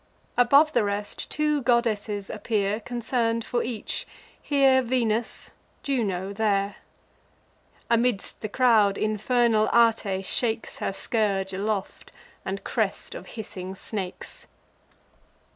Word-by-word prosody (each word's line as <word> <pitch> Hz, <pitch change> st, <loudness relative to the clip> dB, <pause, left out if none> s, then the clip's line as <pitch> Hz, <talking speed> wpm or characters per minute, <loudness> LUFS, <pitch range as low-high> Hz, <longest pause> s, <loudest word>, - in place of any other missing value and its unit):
Above 280 Hz, +6 st, +5 dB
the 240 Hz, -, +3 dB
rest, 205 Hz, 0 st, -3 dB
two 300 Hz, -1 st, +1 dB
goddesses 220 Hz, -5 st, 0 dB
appear 210 Hz, -2 st, -1 dB
Concern'd 230 Hz, 0 st, -1 dB
for 240 Hz, -, 0 dB
each: 230 Hz, -3 st, -4 dB, 0.3 s
here 270 Hz, -2 st, +4 dB
Venus, 235 Hz, -2 st, -1 dB, 0.3 s
Juno 200 Hz, -8 st, -1 dB
there. 200 Hz, -1 st, 0 dB, 1.1 s
Amidst 235 Hz, -3 st, +1 dB
the 215 Hz, -, -4 dB
crowd, 215 Hz, -4 st, +4 dB
infernal 215 Hz, +1 st, +2 dB
Ate 220 Hz, -5 st, +3 dB
shakes 225 Hz, +2 st, -1 dB
Her -, -, -2 dB
scourge 195 Hz, -2 st, -1 dB
aloft, 200 Hz, +1 st, -3 dB, 0.3 s
and 195 Hz, +1 st, -4 dB
crest -, -, -2 dB
of -, -, -9 dB
hissing 190 Hz, -3 st, -6 dB
snakes. 190 Hz, -2 st, -6 dB
220 Hz, 105 wpm, -26 LUFS, 200-240 Hz, 1.1 s, Above